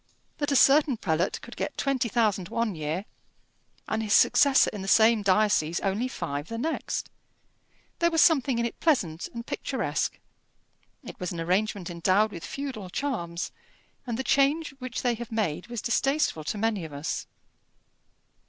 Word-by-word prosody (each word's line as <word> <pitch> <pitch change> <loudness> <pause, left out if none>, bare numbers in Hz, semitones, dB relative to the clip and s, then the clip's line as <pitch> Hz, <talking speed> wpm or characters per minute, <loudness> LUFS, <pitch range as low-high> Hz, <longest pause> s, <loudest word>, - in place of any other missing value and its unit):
That 290 -1 -1
a - - +2
certain 280 -1 +5
prelate 170 -2 0
could - - -11
get - - -4
twenty 265 -3 0
thousand 210 -6 +1
one 230 -3 -1
year 160 +4 -3 0.8
and 220 - -1
his 215 -1 0
successor 280 +3 +5
in 205 - -5
the 190 - -6
same 220 +2 +5
diocese 195 -5 +2
only 205 +5 0
five 145 - -4
the 230 - -5
next! 315 +7 -3 0.9
There 340 - +4
was 325 -1 0
something 275 -7 +4
in 235 - +1
it 235 - -5
pleasant, 185 - +1
and 235 0 -7
picturesque; - - -2 0.9
it - - -10
was 180 - -3
an 170 - -5
arrangement 185 +1 -1
endowed 185 +5 +2
with 170 -4 -8
feudal 260 -9 -5
charms, 180 -9 -3 0.6
and 235 -2 -2
the 265 - -2
change 290 +4 +2
which 255 -2 -5
they 245 -1 +2
have 235 +1 -7
made 190 -5 -2
was 240 -2 -5
distasteful 270 - +1
to 210 - -2
many 215 -3 0
of 155 -2 -8
us. 145 +3 -4
220 Hz, 160 wpm, -27 LUFS, 180-260 Hz, 0.9 s, certain